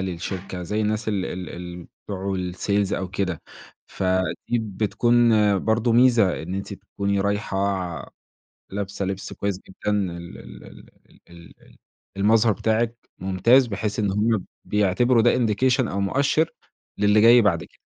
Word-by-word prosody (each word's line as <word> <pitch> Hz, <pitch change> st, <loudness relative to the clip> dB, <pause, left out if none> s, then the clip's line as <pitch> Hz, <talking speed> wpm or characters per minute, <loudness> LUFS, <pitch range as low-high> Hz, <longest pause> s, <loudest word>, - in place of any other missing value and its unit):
للشركة 95 Hz, 0 st, -5 dB
زي 105 Hz, +5 st, -2 dB
الناس 110 Hz, +1 st, -1 dB
ال 100 Hz, -3 st, -1 dB
ال 90 Hz, 0 st, -6 dB
الم 90 Hz, 0 st, -8 dB, 0.2 s
بتوع 100 Hz, -1 st, -3 dB
الsales 95 Hz, +2 st, -1 dB
أو 95 Hz, -, -2 dB
كده، 90 Hz, -2 st, -3 dB, 0.4 s
فدي 95 Hz, +5 st, -1 dB
بتكون 115 Hz, +3 st, +2 dB, 0.3 s
برضه 110 Hz, +4 st, +1 dB
ميزة 115 Hz, -8 st, +4 dB
إن 90 Hz, +4 st, -5 dB
أنتِ 100 Hz, +1 st, -5 dB
تكوني 100 Hz, 0 st, -3 dB
رايحة 100 Hz, 0 st, -1 dB
ع 90 Hz, -7 st, -3 dB, 0.6 s
لابسة 100 Hz, 0 st, -4 dB
لبس 95 Hz, 0 st, -4 dB
كويس 100 Hz, -2 st, -3 dB
جدًا 95 Hz, +2 st, -4 dB
ال 85 Hz, -4 st, -3 dB
ال -, -, -12 dB
ال -, -, -15 dB, 0.4 s
ال 85 Hz, -1 st, -15 dB
ال -, -, -21 dB, 0.4 s
المظهر 110 Hz, +2 st, +4 dB
بتاعكِ 115 Hz, +3 st, 0 dB, 0.2 s
ممتاز 100 Hz, +8 st, +3 dB
بحيث 105 Hz, -1 st, -3 dB
إن 105 Hz, -2 st, +1 dB
هم 110 Hz, +3 st, +2 dB
ب 95 Hz, -, -6 dB, 0.2 s
بيعتبروا 105 Hz, +4 st, +2 dB
ده 120 Hz, -, +4 dB
indication 125 Hz, +2 st, +1 dB
أو 100 Hz, -, -2 dB
مؤشّر 140 Hz, +10 st, +1 dB, 0.5 s
للي 105 Hz, +1 st, +4 dB
جاي 120 Hz, +2 st, +7 dB
بعد 105 Hz, -, +1 dB
كده. -, -, -21 dB
100 Hz, 145 wpm, -23 LUFS, 95-110 Hz, 0.6 s, جاي